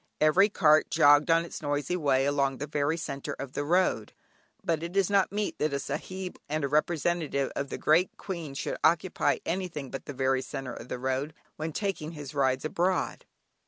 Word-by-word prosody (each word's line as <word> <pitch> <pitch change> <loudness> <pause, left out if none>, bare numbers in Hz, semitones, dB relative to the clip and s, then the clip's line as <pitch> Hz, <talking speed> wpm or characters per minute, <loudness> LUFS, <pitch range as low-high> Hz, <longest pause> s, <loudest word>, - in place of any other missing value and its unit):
Every 175 +7 +5
cart 155 -6 +4
jogged 145 +2 +5
on 165 +1 +4
its - - -8
noisy 145 +2 -1
way 135 -5 +2
along 140 -1 +1
the 145 - -4
very 150 +2 0
centre 140 -4 -4
of 135 -1 -7
the 145 - -2
road; 165 - +1 0.5
but 165 -2 0
it 170 +3 -4
is 195 0 +2
not 195 -2 +3
meet 210 +1 -2
that 150 -1 0
a - - +1
Sahib 180 +7 -5
and 155 0 -1
a - - +2
representative 150 -1 0
of 140 0 -3
the - - -4
great 165 +4 +2
Queen 170 -8 -6
should - - -3
occupy 170 +2 +2
anything 165 -7 -3
but 135 - -6
the 145 - -6
very 130 0 +1
centre 135 -2 -6
of 115 - -9
the - - -4
road 130 +4 -2 0.2
when 155 +1 -4
taking 170 -3 -3
his 145 -3 -8
rides 135 -1 +1
abroad. 180 +4 -1
150 Hz, 195 wpm, -28 LUFS, 140-170 Hz, 0.5 s, Every